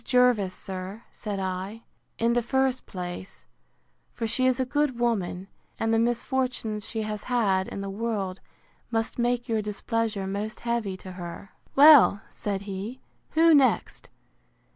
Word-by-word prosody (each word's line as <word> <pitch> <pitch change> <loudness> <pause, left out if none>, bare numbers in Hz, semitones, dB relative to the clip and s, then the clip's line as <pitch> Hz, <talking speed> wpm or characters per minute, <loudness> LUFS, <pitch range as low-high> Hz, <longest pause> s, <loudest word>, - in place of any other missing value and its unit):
Jervis, 245 -7 +3
sir, 190 +4 -7
said 205 -3 -5
I, 190 +4 -4 0.3
in 230 +1 +2
the 240 - +2
first 265 +1 0
place; 180 0 -7 0.7
for 230 - -4
she 255 +3 +2
is 255 -1 +2
a 260 - +2
good 290 -1 0
woman; 195 -6 -1 0.3
and 225 0 +1
the 225 - +4
misfortunes 240 -2 -1
she 220 -1 -2
has 215 -1 -5
had 200 -7 +1
in 200 - -5
the 195 - -4
world, 200 -3 -2 0.5
must 225 0 -2
make 240 +1 +1
your 225 -2 +1
displeasure 210 0 -2
most 205 +3 -4
heavy 235 -5 -1
to 185 0 -9
her. 180 +1 -8 0.2
Well, 280 -7 +8
said 200 -2 -3
he, 200 +5 -6 0.3
who 330 +1 +6
next? 270 -6 +2
225 Hz, 145 wpm, -27 LUFS, 195-245 Hz, 0.7 s, Well